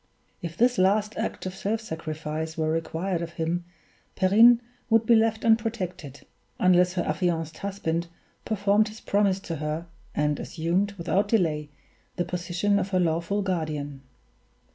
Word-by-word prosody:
If 170 Hz, -1 st, -6 dB
this 245 Hz, -1 st, +3 dB
last 205 Hz, +3 st, +2 dB
act 225 Hz, -, -3 dB
of 185 Hz, -, -3 dB
self 200 Hz, +3 st, -2 dB
sacrifice 160 Hz, -4 st, -5 dB
were 155 Hz, -1 st, 0 dB
required 165 Hz, +2 st, -2 dB
of 170 Hz, 0 st, -5 dB
him, 170 Hz, +1 st, -2 dB, 0.5 s
Perrine 225 Hz, +5 st, +6 dB, 0.3 s
would 225 Hz, 0 st, +4 dB
be 235 Hz, -, +5 dB
left 225 Hz, 0 st, +2 dB
unprotected, 205 Hz, -, 0 dB, 0.3 s
unless 180 Hz, 0 st, +4 dB
her 180 Hz, -, 0 dB
affianced 160 Hz, 0 st, -1 dB
husband 175 Hz, -4 st, -2 dB, 0.4 s
performed 205 Hz, 0 st, +2 dB
his 215 Hz, +1 st, -9 dB
promise 200 Hz, -2 st, +1 dB
to 165 Hz, -4 st, -5 dB
her, 155 Hz, +3 st, -3 dB, 0.3 s
and 150 Hz, -1 st, +1 dB
assumed, 180 Hz, +5 st, -1 dB
without 195 Hz, +2 st, 0 dB
delay, 160 Hz, -9 st, +1 dB, 0.5 s
the 175 Hz, -, -1 dB
position 180 Hz, +3 st, 0 dB
of 200 Hz, -, -2 dB
her 185 Hz, -2 st, +1 dB
lawful 170 Hz, +4 st, 0 dB
guardian. 155 Hz, -6 st, -3 dB
180 Hz, 140 wpm, -26 LUFS, 160-205 Hz, 0.5 s, Perrine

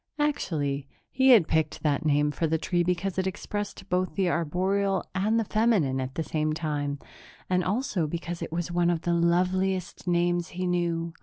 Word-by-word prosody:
Actually, 150 Hz, -, -1 dB, 0.2 s
he 265 Hz, +1 st, +3 dB
had 220 Hz, -10 st, +7 dB
picked 160 Hz, -1 st, 0 dB
that 150 Hz, 0 st, +1 dB
name 150 Hz, -1 st, +2 dB
for 165 Hz, +2 st, -1 dB
the 160 Hz, +1 st, +1 dB
tree 175 Hz, +2 st, 0 dB
because 180 Hz, +2 st, -1 dB
it 190 Hz, -, 0 dB
expressed 205 Hz, 0 st, -5 dB
both 185 Hz, 0 st, -1 dB
the 190 Hz, -2 st, +1 dB
arboreal 185 Hz, +4 st, 0 dB
and 210 Hz, +4 st, +1 dB
the 225 Hz, -, 0 dB
feminine 200 Hz, -, +2 dB
at 130 Hz, +1 st, -5 dB
the 160 Hz, -, -1 dB
same 155 Hz, -1 st, -1 dB
time 145 Hz, -3 st, -2 dB, 0.5 s
and 180 Hz, 0 st, +3 dB
also 200 Hz, -, 0 dB
because 170 Hz, +2 st, -5 dB
it -, -, -5 dB
was 175 Hz, +1 st, -3 dB
one 175 Hz, 0 st, +2 dB
of 170 Hz, -2 st, 0 dB
the 175 Hz, -, 0 dB
loveliest 180 Hz, +1 st, 0 dB
names 175 Hz, 0 st, +1 dB
he 185 Hz, 0 st, -4 dB
knew. 170 Hz, -2 st, -1 dB
175 Hz, 180 wpm, -27 LUFS, 160-190 Hz, 0.5 s, had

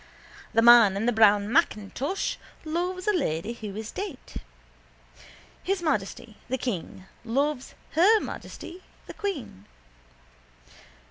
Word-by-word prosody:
The 225 Hz, -, +4 dB
man 230 Hz, -5 st, +8 dB
in 210 Hz, -, -1 dB
the 245 Hz, -, +3 dB
brown 210 Hz, -2 st, +4 dB
macintosh 275 Hz, -, 0 dB, 0.3 s
loves 355 Hz, +3 st, -2 dB
a 420 Hz, -, +4 dB
lady 220 Hz, -, -1 dB
who 215 Hz, -4 st, -8 dB
is 220 Hz, +1 st, -6 dB
dead. 385 Hz, -8 st, -5 dB, 1.5 s
His 380 Hz, -1 st, -1 dB
Majesty 220 Hz, -, -2 dB
the 260 Hz, -, 0 dB
King 190 Hz, -6 st, -5 dB, 0.2 s
loves 270 Hz, +3 st, -1 dB, 0.2 s
Her 400 Hz, +8 st, +5 dB
Majesty 365 Hz, -2 st, -8 dB, 0.2 s
the -, -, -9 dB
Queen. 295 Hz, -, -5 dB
245 Hz, 115 wpm, -26 LUFS, 215-345 Hz, 1.5 s, man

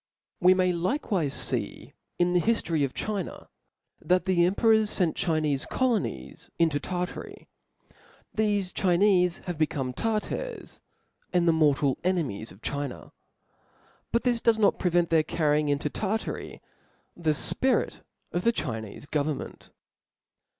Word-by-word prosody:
Wq 180 Hz, +1 st, +6 dB
may 185 Hz, -1 st, +2 dB
likewife 180 Hz, -, -1 dB, 0.2 s
fee -, -, -4 dB, 0.2 s
in 175 Hz, 0 st, +2 dB
the 180 Hz, -, +3 dB
hiftory 170 Hz, -9 st, +1 dB
of 135 Hz, -, -2 dB
China, 210 Hz, -3 st, -4 dB, 0.5 s
f*>A» -, -, -19 dB
that 180 Hz, 0 st, +3 dB
the 180 Hz, -3 st, +3 dB
emperors 220 Hz, +2 st, +3 dB
() -, -, 0 dB
fent 175 Hz, -5 st, +2 dB
Chinefe 155 Hz, -6 st, 0 dB
colonies 210 Hz, -, -2 dB
into 160 Hz, -4 st, +2 dB
•moSror* -, -, -8 dB
Tartary. 180 Hz, 0 st, -5 dB, 0.9 s
Thefe 205 Hz, -4 st, +1 dB
Chinefe 180 Hz, -1 st, +2 dB
are 175 Hz, -, -1 dB
become 145 Hz, -5 st, -1 dB
Tartars, 225 Hz, -, -3 dB, 0.5 s
and 180 Hz, -, +3 dB
j^*^^ft -, -, +1 dB
the 165 Hz, -, +4 dB
mortal 145 Hz, -4 st, +2 dB
enemies 155 Hz, -, -1 dB
of 95 Hz, +4 st, -17 dB
China; 140 Hz, -2 st, -4 dB, 1.0 s
but 235 Hz, -, +1 dB
this 240 Hz, -2 st, +1 dB
does 230 Hz, -1 st, +4 dB
not 210 Hz, -2 st, +3 dB
prevent 175 Hz, -2 st, +1 dB
their 160 Hz, -1 st, +5 dB
carrying 150 Hz, -1 st, +1 dB
into 145 Hz, +1 st, 0 dB
Tartary 215 Hz, +8 st, -3 dB, 0.5 s
the 170 Hz, -2 st, -1 dB
Ijpirit 255 Hz, -, +1 dB, 0.3 s
o^ 175 Hz, -, 0 dB
the 230 Hz, -, +3 dB
Chinefe 110 Hz, -, -5 dB
government. 150 Hz, -1 st, -3 dB
175 Hz, 135 wpm, -27 LUFS, 150-205 Hz, 1.0 s, Wq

